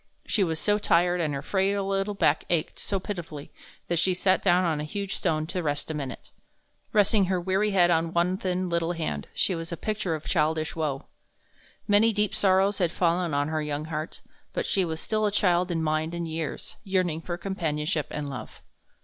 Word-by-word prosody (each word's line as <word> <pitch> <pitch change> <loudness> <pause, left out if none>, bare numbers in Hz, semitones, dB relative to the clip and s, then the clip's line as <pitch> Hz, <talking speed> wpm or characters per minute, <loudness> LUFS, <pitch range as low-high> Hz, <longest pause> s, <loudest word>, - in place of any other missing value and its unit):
She 205 - +2
was 160 -3 -1
so 205 +5 +2
tired, 175 -2 +3
and 155 -3 0
her 140 - -4
frail 195 +3 0
little 195 +1 -1
back - - +2
ached 170 -3 0
so 195 - -1
pitifully, 170 -7 -6 0.4
that 170 -1 +1
she 185 +2 +2
sat 185 +1 +2
down 180 -1 +4
on 160 -3 0
a - - -2
huge 200 +6 -4
stone 155 -1 0
to 180 +3 -3
rest 145 0 -2
a - - -3
minute. 135 -5 -6 0.6
Resting 205 -1 +4
her 185 0 0
weary 190 +4 +1
head 180 -3 +4
on 165 0 +2
one 175 +2 +2
thin 185 -1 -1
little 170 0 0
hand, 115 - -3
she 190 - +2
was 165 +1 -4
a 170 - -3
picture 205 -3 -2
of 155 - -8
childish 155 -1 0
woe. 150 -4 -2 0.8
Many 210 +2 +5
deep 210 -1 +1
sorrows 195 +1 +3
had 175 -3 +2
fallen 170 -3 +1
on 145 +1 +1
her 155 0 -1
young 150 0 -3
heart, 155 +2 -4 0.3
but - - -1
she 195 - +2
was 160 -2 -3
still 215 +2 0
a - - 0
child 180 -3 +2
in 165 -2 -1
mind 155 +2 0
and 170 -1 -3
years, 160 -1 -4
yearning 185 -5 0
for 175 +1 -4
companionship 160 -5 -1
and 150 -1 -4
love. 125 -6 -8
175 Hz, 200 wpm, -27 LUFS, 155-195 Hz, 0.8 s, Many